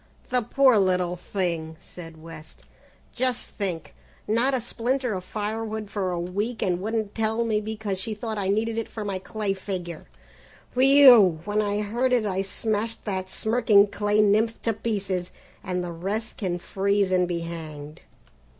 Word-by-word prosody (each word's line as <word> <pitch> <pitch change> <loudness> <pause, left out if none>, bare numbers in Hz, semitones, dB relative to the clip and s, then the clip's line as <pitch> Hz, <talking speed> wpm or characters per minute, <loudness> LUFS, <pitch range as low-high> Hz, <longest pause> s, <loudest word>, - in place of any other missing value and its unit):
"The 250 0 +2
poor 255 0 +4
little 180 -2 +1
thing," 170 -3 -3
said 165 -2 -11
West, 160 -1 -12 0.5
"just 255 -1 -1
think, 180 -6 -4 0.3
not 240 +5 +2
a - - +1
splinter 245 +1 -1
of 185 -1 -4
firewood 215 +1 -4
for 195 -3 -1
a 175 -1 -2
week 205 +7 -2
and 180 -1 0
wouldn't 220 0 -2
tell 225 +1 0
me 215 -2 +1
because 210 -3 -4
she 215 +2 -3
thought 220 -1 -4
I 195 - -1
needed 220 +3 0
it 225 - -3
for 215 -2 -6
my 195 -2 -2
clay 205 +1 -2
figure. 185 -4 -6 0.7
Whew! 255 - +7
When 210 +1 +1
I 205 0 0
heard 240 +5 0
it 240 -3 +3
I 190 -2 0
smashed 220 +3 -2
that 190 -3 -3
smirking 220 -1 +4
clay 210 +1 +2
nymph 215 +2 +2
to 225 - +1
pieces, 195 -5 -2 0.3
and 180 -1 -2
the 175 - -4
rest 200 +7 -4
can 180 -4 -2
freeze 200 +2 0
and 180 -1 +3
be 170 -1 -2
hanged!" 155 -3 -7
205 Hz, 165 wpm, -25 LUFS, 185-225 Hz, 0.7 s, Whew